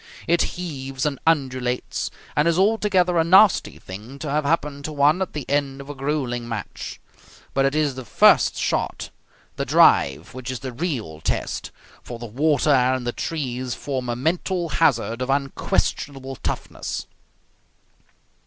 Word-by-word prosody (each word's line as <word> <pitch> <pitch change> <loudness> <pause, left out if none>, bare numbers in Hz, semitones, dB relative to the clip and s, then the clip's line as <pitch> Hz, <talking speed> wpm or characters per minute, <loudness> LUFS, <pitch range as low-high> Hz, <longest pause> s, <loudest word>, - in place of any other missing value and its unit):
It 170 +1 +1
heaves 135 -6 -4
and 145 -3 -1
undulates, 130 -5 0 0.3
and 150 +2 +3
is 170 0 +2
altogether 190 -4 +3
a - - +4
nasty 190 +4 +5
thing 105 +9 -9
to 145 0 -4
have 150 0 0
happen 145 -2 0
to 155 - -5
one 150 +4 +3
at 190 - -2
the 150 -3 -4
end 140 -1 0
of 140 +1 -7
a - - -6
gruelling 135 -4 -2
match. 110 -4 -6 0.5
But 135 0 +2
it 135 +2 +1
is 150 -3 +1
the 130 0 -7
first 115 - +4
shot, - - -2 0.5
the - - 0
drive, 70 +4 +4
which 130 0 -7
is 130 -2 -4
the 130 -2 -5
real 120 - -3
test, - - -2 0.3
for 120 - -8
the 120 - -7
water 145 +6 +2
and 130 -1 +3
the 120 - 0
trees 130 -5 -3
form 130 -3 -4
a 120 - 0
mental 170 +5 -1
hazard 125 -7 +1
of 130 - -2
unquestionable 135 0 -1
toughness. - - -4
140 Hz, 155 wpm, -23 LUFS, 125-155 Hz, 0.5 s, nasty